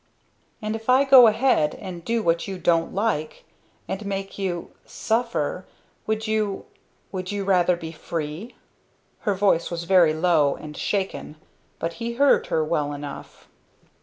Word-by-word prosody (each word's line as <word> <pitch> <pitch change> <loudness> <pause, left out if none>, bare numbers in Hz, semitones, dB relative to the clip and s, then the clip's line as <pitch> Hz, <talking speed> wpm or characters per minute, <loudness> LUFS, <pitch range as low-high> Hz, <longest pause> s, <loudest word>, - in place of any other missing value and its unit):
"And 215 +1 -2
if 225 +2 -7
I 260 +2 +6
go 265 -3 +8
ahead, 220 - +2
and 180 -3 -8
do 230 +2 -1
what 170 0 +1
you 195 -1 -5
don't 165 -1 +1
like 190 -7 -2 0.4
and 195 +2 -4
make 195 0 -5
you 180 -3 -3
suffer 220 -7 -2 0.4
would 220 0 -1
you 215 -3 -1 0.5
would 185 -1 -4
you 205 -1 -2
rather 180 -2 +3
be 165 -2 -7
free?" 165 +8 -6 0.7
Her 200 - +2
voice 190 -4 +2
was 170 -1 -4
very 170 -3 +4
low 155 -4 +3
and 150 -1 -10
shaken, 190 -8 -3 0.4
but 165 0 -3
he 235 0 -2
heard 280 +4 +3
her 160 - +1
well 150 -2 -1
enough. 145 0 -9
185 Hz, 150 wpm, -24 LUFS, 165-215 Hz, 0.7 s, go